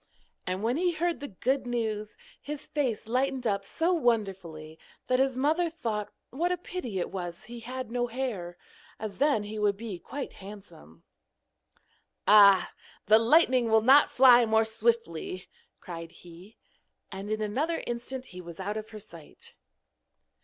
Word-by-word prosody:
And 185 Hz, +2 st, -2 dB
when 240 Hz, +4 st, +1 dB
he 355 Hz, +1 st, +1 dB
heard 335 Hz, -2 st, -1 dB
the 285 Hz, -, -6 dB
good 255 Hz, +6 st, -1 dB
news, 220 Hz, -, -3 dB, 0.2 s
his 295 Hz, 0 st, -7 dB
face 250 Hz, -7 st, -2 dB
lightened 260 Hz, +2 st, 0 dB
up 200 Hz, -3 st, 0 dB
so 330 Hz, -, 0 dB
wonderfully 190 Hz, -, -1 dB, 0.3 s
that 255 Hz, 0 st, +1 dB
his 265 Hz, -1 st, +1 dB
mother 315 Hz, +6 st, +2 dB
thought 220 Hz, -10 st, -4 dB, 0.2 s
what 340 Hz, +7 st, 0 dB
a 360 Hz, -, 0 dB
pity 330 Hz, -, -5 dB
it 180 Hz, -, -2 dB
was 175 Hz, -1 st, -5 dB
that -, -, -13 dB
he 240 Hz, +1 st, -9 dB
had 250 Hz, 0 st, -6 dB
no 245 Hz, 0 st, 0 dB
hair, 225 Hz, -9 st, -4 dB, 0.4 s
as 210 Hz, -3 st, -6 dB
then 280 Hz, -7 st, +3 dB
he 215 Hz, +1 st, -6 dB
would 205 Hz, -1 st, +1 dB
be 210 Hz, -5 st, -6 dB
quite 280 Hz, +7 st, -6 dB
handsome. 190 Hz, -, -13 dB, 1.2 s
'Ah, 200 Hz, -2 st, +7 dB, 0.3 s
the 215 Hz, +2 st, +6 dB
lightning 250 Hz, -1 st, +4 dB
will 220 Hz, 0 st, +4 dB
not 270 Hz, +4 st, +7 dB
fly 250 Hz, -2 st, +7 dB
more 220 Hz, 0 st, +3 dB
swiftly,' 220 Hz, -6 st, -1 dB, 0.3 s
cried 165 Hz, -2 st, -8 dB
he. 175 Hz, +5 st, -15 dB, 0.5 s
And 195 Hz, +2 st, -6 dB
in 215 Hz, 0 st, -1 dB
another 270 Hz, +11 st, -1 dB
instant 240 Hz, +2 st, -5 dB
he 180 Hz, -6 st, -10 dB
was 170 Hz, 0 st, -11 dB
out 205 Hz, +3 st, -3 dB
of 215 Hz, 0 st, -6 dB
her 215 Hz, -, -9 dB
sight. 170 Hz, -7 st, -12 dB
225 Hz, 160 wpm, -28 LUFS, 195-260 Hz, 1.2 s, Ah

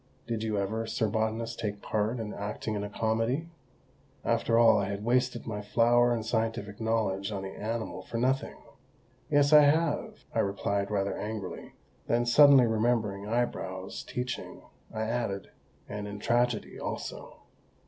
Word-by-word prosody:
Did 115 Hz, -2 st, -3 dB
you 110 Hz, -2 st, -1 dB
ever, 110 Hz, +3 st, -2 dB
sir 110 Hz, -, 0 dB
botanist, 110 Hz, +2 st, -2 dB
take 105 Hz, -2 st, -3 dB
part 110 Hz, +3 st, -1 dB
in 110 Hz, -2 st, -4 dB
acting 105 Hz, +1 st, -4 dB
a 105 Hz, 0 st, -3 dB
comedy?" 115 Hz, +9 st, -1 dB, 0.8 s
After 115 Hz, 0 st, +2 dB
all, 115 Hz, -2 st, +6 dB
I 100 Hz, -1 st, -1 dB
had 100 Hz, +1 st, -4 dB
wasted 125 Hz, 0 st, +1 dB
my 105 Hz, -2 st, -4 dB
flower 120 Hz, +3 st, +3 dB
and 115 Hz, -2 st, -1 dB
scientific 110 Hz, -2 st, -2 dB
knowledge 110 Hz, -3 st, 0 dB
on 100 Hz, -2 st, -4 dB
the 95 Hz, -, -4 dB
animal 110 Hz, +1 st, -4 dB
for 115 Hz, -, -6 dB
nothing! 130 Hz, +3 st, 0 dB, 0.7 s
"Yes, 145 Hz, 0 st, +4 dB
I 150 Hz, -, +10 dB
have!" 150 Hz, +1 st, +1 dB
I -, -, 0 dB
replied 100 Hz, 0 st, 0 dB
rather 100 Hz, -1 st, 0 dB
angrily; 105 Hz, -3 st, -6 dB, 0.3 s
then, 120 Hz, +1 st, +2 dB
suddenly 135 Hz, +1 st, +7 dB
remembering 110 Hz, -3 st, 0 dB
Eyebrows' 95 Hz, -5 st, -2 dB
teaching, 125 Hz, 0 st, -5 dB, 0.3 s
I 110 Hz, 0 st, -3 dB
added, 110 Hz, -4 st, -2 dB, 0.4 s
"and 105 Hz, 0 st, -5 dB
in 100 Hz, 0 st, -6 dB
tragedy 120 Hz, +1 st, 0 dB
also." -, -, -6 dB
110 Hz, 150 wpm, -29 LUFS, 105-120 Hz, 0.8 s, I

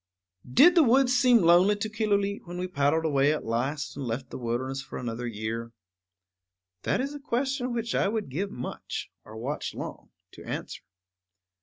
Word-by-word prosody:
Did 335 Hz, -, +7 dB
the 345 Hz, -, +6 dB
woods 255 Hz, -1 st, +4 dB
seem 245 Hz, -4 st, +5 dB
lonely 175 Hz, +5 st, +6 dB
to 205 Hz, +1 st, -3 dB
Killooleet 205 Hz, -3 st, -1 dB
when 175 Hz, +1 st, -6 dB
we 180 Hz, +1 st, -2 dB
paddled 160 Hz, -1 st, +1 dB
away 140 Hz, -1 st, +3 dB
at 155 Hz, -, -2 dB
last 130 Hz, +6 st, -2 dB
and 140 Hz, -, -5 dB
left 125 Hz, +2 st, -4 dB
the -, -, -6 dB
wilderness 130 Hz, +3 st, -2 dB
for 135 Hz, -, -8 dB
another 120 Hz, 0 st, -4 dB
year? 115 Hz, +1 st, -4 dB, 1.1 s
That -, -, 0 dB
is 275 Hz, +3 st, -2 dB
a 290 Hz, -, -7 dB
question 265 Hz, -1 st, -1 dB
which 230 Hz, -1 st, -2 dB
I -, -, +2 dB
would 215 Hz, -5 st, -2 dB
give 185 Hz, +10 st, -2 dB
much, 125 Hz, -9 st, -6 dB
or 110 Hz, +1 st, -11 dB
watch 135 Hz, +7 st, -4 dB
long, -, -, -7 dB, 0.2 s
to -, -, -12 dB
answer. -, -, -5 dB
170 Hz, 175 wpm, -27 LUFS, -, 1.1 s, Did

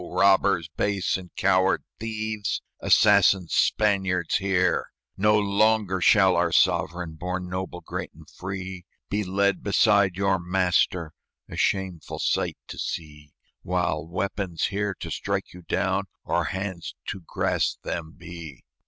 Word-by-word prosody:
robbers 100 Hz, -3 st, +3 dB
base 100 Hz, -3 st, 0 dB
and 90 Hz, -1 st, -6 dB
coward 95 Hz, 0 st, +2 dB, 0.2 s
thieves! 110 Hz, -1 st, -3 dB, 0.2 s
Assassin 100 Hz, -3 st, +5 dB
Spaniards, 95 Hz, -3 st, +2 dB
hear! 95 Hz, -2 st, +1 dB, 0.3 s
"No 105 Hz, +2 st, +3 dB
longer 100 Hz, -2 st, +2 dB
shall 95 Hz, +1 st, +5 dB
our 85 Hz, -1 st, +2 dB
sovereign, 85 Hz, 0 st, +1 dB
Born 90 Hz, +3 st, -4 dB
noble, 90 Hz, -1 st, -5 dB
great, -, -, -5 dB
and -, -, -15 dB
free, 95 Hz, -1 st, -6 dB, 0.3 s
Be 105 Hz, +1 st, 0 dB
led 100 Hz, +1 st, +1 dB
beside 100 Hz, -2 st, +3 dB
your 95 Hz, -1 st, +1 dB
master, 90 Hz, -2 st, +1 dB, 0.3 s
A -, -, -9 dB
shameful 95 Hz, -4 st, -1 dB
sight -, -, 0 dB
to -, -, -7 dB
see, 75 Hz, -2 st, -6 dB, 0.3 s
While 80 Hz, -, -1 dB
weapons 95 Hz, 0 st, -3 dB
here 100 Hz, -1 st, -2 dB
to -, -, -5 dB
strike -, -, -3 dB
you 90 Hz, -, -11 dB
down 95 Hz, +2 st, 0 dB, 0.2 s
Or -, -, 0 dB
hands 95 Hz, -2 st, -4 dB
to 100 Hz, -, -4 dB
grasp 85 Hz, -, -1 dB
them 80 Hz, -1 st, -5 dB
be." 85 Hz, -5 st, -10 dB
95 Hz, 130 wpm, -25 LUFS, 90-100 Hz, 0.3 s, Assassin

